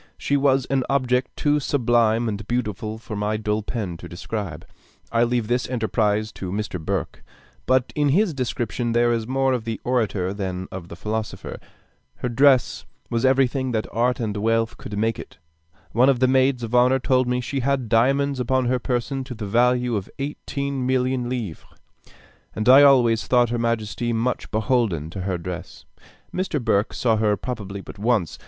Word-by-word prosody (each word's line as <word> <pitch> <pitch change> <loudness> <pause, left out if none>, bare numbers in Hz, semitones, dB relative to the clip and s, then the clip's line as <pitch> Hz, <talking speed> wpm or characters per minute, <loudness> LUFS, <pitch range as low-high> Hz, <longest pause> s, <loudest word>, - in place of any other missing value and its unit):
She 140 - 0
was 135 -2 +3
an 135 -1 0
object 130 -2 +1
too 150 0 +2
sublime 120 -4 +2
and 105 -1 -4
beautiful 110 -3 -2
for 110 -1 -8
my 105 +1 -1
dull 105 0 -1
pen 100 -6 -4
to - - -10
describe. 90 -2 -5 0.5
I 115 0 +3
leave 120 -2 0
this 125 +1 0
enterprise 110 -3 0
to 95 -4 -6
Mr. 100 -4 -4
Burke. - - -3 0.4
But 130 -1 +2
in 145 -1 +2
his 185 +4 +2
description, 120 -2 -2
there 120 0 +3
is 115 -1 -1
more 135 0 +1
of 125 -3 -2
the 115 -1 -4
orator 105 -7 0
than 95 -2 -4
of 90 -2 -7
the 85 - -9
philosopher. 110 +4 -4 0.6
Her 125 - -3
dress 130 +1 +3 0.3
was 115 +2 +1
everything 130 -1 +2
that 110 -1 0
art 120 +2 +1
and 110 -3 -2
wealth 115 +2 +1
could 105 - -7
make 115 +2 0
it. - - -10 0.5
One 125 +4 +4
of 130 -3 +2
the 130 - +4
maids 130 -1 +2
of 115 0 -5
honor 125 +2 +5
told 130 0 +1
me 125 0 0
she 135 +2 -3
had 135 -1 0
diamonds 135 +5 +2
upon 130 +1 +1
her 125 +1 +1
person 125 +2 -2
to 125 -2 -7
the 110 -2 -5
value 125 +3 +2
of 100 -2 -4
eighteen 140 -1 -3
millions 130 -1 0
of - - -5
livres; 110 -10 -4 0.9
and 110 - -2
I 130 +3 +9
always 125 -5 +5
thought 120 -2 +3
her 120 - -1
majesty 115 0 -1
much 115 +2 -1
beholden 110 - 0
to 95 - -5
her 95 -1 -2
dress. 85 +1 -7 0.5
Mr. 185 -5 -1
Burke 105 -3 +1
saw 115 -3 +2
her 105 -1 +2
probably 100 -5 -5
but 100 - -11
once. 110 -6 0
120 Hz, 180 wpm, -23 LUFS, 110-130 Hz, 0.9 s, I